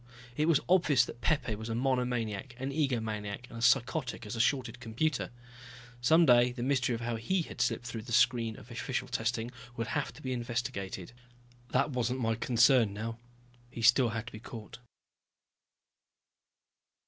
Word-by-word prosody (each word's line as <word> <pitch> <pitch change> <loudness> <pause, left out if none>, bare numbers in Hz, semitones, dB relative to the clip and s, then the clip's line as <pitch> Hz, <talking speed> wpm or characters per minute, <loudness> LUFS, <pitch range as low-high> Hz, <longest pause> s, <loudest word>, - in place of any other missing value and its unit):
It 155 +4 +1
was 165 -4 +5
obvious 155 -9 +4
that 120 - -10
Pepe 140 -8 +1
was 110 +2 -6
a 115 - -1
monomaniac, 125 -2 -1
an 135 +2 -3
egomaniac, 115 -6 -2
and 115 - -8
as 115 - +2
psychotic 125 0 +1
as 105 - -5
a - - -5
shorted 125 -1 +1
computer. 125 +5 -1 0.7
Some 160 +7 +5
day 120 -2 +6
the 120 -1 -5
mystery 130 -2 +1
of 115 - -6
how 115 -1 -2
he 175 +11 0
had - - -6
slipped 125 - 0
through 115 -2 -5
the 120 - -10
screen 120 -2 +3
of 115 - -13
official 125 +2 -3
testing 120 -1 -2 0.3
would 115 0 -2
have 145 -2 -1
to - - -14
be 130 -1 -2
investigated. 120 -6 -4 0.6
That 150 - +1
wasn't 125 0 -1
my 115 -2 +1
concern 120 -2 +4
now. 115 +2 -5 0.5
He 115 -1 -7
still 120 +2 +6
had 110 0 -4
to 115 - -9
be 110 - -7
caught. 110 0 -9
120 Hz, 170 wpm, -31 LUFS, 115-130 Hz, 0.7 s, day